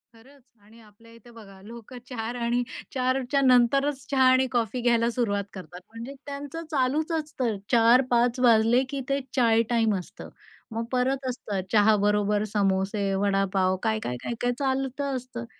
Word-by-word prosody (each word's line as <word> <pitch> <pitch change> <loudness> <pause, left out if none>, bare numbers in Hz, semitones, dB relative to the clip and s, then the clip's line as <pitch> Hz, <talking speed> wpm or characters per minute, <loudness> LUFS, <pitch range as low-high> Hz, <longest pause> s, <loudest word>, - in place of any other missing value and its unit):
खरंच! 270 +5 -19 0.2
आणि 225 +2 -18
आपल्या 220 +2 -19
इथे 235 +1 -17
बघा 195 -4 -14
लोकं 235 +3 -11
4:00 235 -1 -5
आणि 240 +1 0 0.3
4:00च्या 260 +1 0
नंतरच 265 +2 +3
चहा 265 -1 +3
आणि 260 0 +3
कॉफी 240 -1 -1
घ्यायला 235 -1 +2
सुरुवात 215 -5 -1
करतात. 180 -2 -10
म्हणजे 230 +4 -8
त्यांचं 285 +3 -6
चालूच 295 +4 0
असतं. 300 -8 -2 0.2
4:00-5:00 240 +1 +3
वाजले 235 +1 +4
की 280 -1 -4
ते 275 0 +1 0.2
चाय 230 -3 +4
टाईम 225 -2 +2
असतं. 180 - -8 0.4
मग 225 +1 -3
परत 260 +1 0
असतं 205 -6 -4
चहाबरोबर 210 -1 +3
समोसे, 195 0 0
वडापाव, 195 -1 +1
काय, 220 -1 0
काय, 125 - -3
काय, 235 - -3
काय 245 - +1
चालतं 270 0 -2
असतं. 245 -2 -6
235 Hz, 150 wpm, -26 LUFS, 215-260 Hz, 0.4 s, वाजले